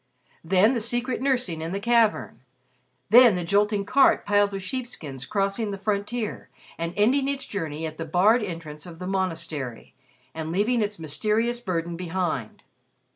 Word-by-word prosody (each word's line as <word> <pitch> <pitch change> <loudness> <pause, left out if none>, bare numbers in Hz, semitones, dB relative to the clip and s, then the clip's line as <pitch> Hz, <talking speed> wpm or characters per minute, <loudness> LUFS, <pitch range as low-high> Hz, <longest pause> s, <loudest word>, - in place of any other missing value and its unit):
Then 190 +7 +4
the 235 - -1
secret 240 +3 -1
nursing 245 -12 0
in 165 +2 -4
the 195 - -2
cavern; 230 - +2 0.7
then 240 -3 +8
the 180 - -2
jolting 205 +3 +1
cart 275 +6 +4
piled 205 0 +3
with 195 -1 -5
sheepskins 185 - -6
crossing 200 +2 -1
the 200 - -4
frontier, 210 +3 -3 0.3
and 170 +1 -4
ending 265 +7 +3
its 275 -1 -2
journey 160 -5 -4
at 155 0 -7
the 165 - -3
barred 195 +9 +3
entrance 165 -5 -6
of 170 -2 -10
the 180 - -7
monastery 165 -9 -3 0.4
and 160 0 -5
leaving 220 +6 +1
its 210 0 -2
mysterious 215 +10 -1
burden 170 -6 -3
behind. 175 - -3
200 Hz, 155 wpm, -25 LUFS, 165-225 Hz, 0.7 s, then